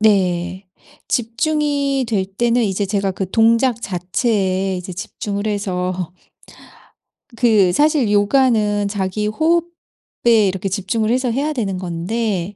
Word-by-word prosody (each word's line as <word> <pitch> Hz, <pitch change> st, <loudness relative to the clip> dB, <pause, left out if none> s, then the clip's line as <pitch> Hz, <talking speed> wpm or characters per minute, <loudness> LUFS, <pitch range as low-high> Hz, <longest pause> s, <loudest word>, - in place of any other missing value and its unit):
네. 185 Hz, -3 st, +1 dB, 0.4 s
집중이 280 Hz, +2 st, 0 dB
될 200 Hz, -4 st, 0 dB
때는 235 Hz, +5 st, 0 dB
이제 200 Hz, -1 st, 0 dB
제가 195 Hz, -1 st, 0 dB
그 185 Hz, 0 st, -4 dB
동작 230 Hz, +2 st, +3 dB
자체에 190 Hz, 0 st, -1 dB
이제 180 Hz, +1 st, -6 dB
집중을 200 Hz, +3 st, -5 dB
해서 185 Hz, -4 st, -2 dB, 1.3 s
그 215 Hz, -7 st, +4 dB
사실 290 Hz, -, +2 dB
요가는 210 Hz, -2 st, +2 dB
자기 200 Hz, +1 st, -2 dB
호흡에 315 Hz, -, 0 dB
이렇게 190 Hz, +1 st, -2 dB
집중을 215 Hz, +3 st, -1 dB
해서 255 Hz, -1 st, +1 dB
해야 290 Hz, +5 st, -1 dB
되는 205 Hz, -8 st, -2 dB
건데 185 Hz, +2 st, -3 dB
205 Hz, 235 characters per minute, -19 LUFS, 190-235 Hz, 1.3 s, 그